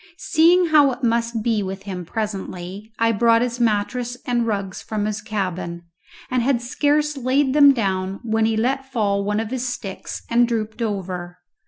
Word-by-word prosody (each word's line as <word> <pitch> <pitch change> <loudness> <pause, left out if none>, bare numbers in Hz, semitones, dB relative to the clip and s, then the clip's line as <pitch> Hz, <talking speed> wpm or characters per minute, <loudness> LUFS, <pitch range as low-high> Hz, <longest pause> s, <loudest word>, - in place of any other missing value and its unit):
Seeing 340 +2 +4
how 295 -3 +6
it 250 +2 -11
must 230 -1 0
be 225 -2 +1
with 190 0 -5
him 185 -3 -6
presently, 200 0 -5
I 230 0 +3
brought 230 +1 +4
his 245 0 -3
mattress 240 +2 0
and 240 -1 0
rugs 200 -3 -3
from 215 -1 -3
his 210 -1 -2
cabin, 185 -5 -4 0.5
and 255 -1 +2
had 250 0 +2
scarce 295 +5 +1
laid 265 +1 +1
them 285 -1 +8
down 195 -5 -1
when 220 -1 +1
he 220 0 +1
let 265 +4 -1
fall 200 -5 +1
one 210 +1 0
of 225 0 -4
his 255 -1 -2
sticks 195 -6 -6
and 240 +1 +3
drooped 220 -1 -3
over. 185 -5 -3
225 Hz, 175 wpm, -22 LUFS, 200-250 Hz, 0.5 s, them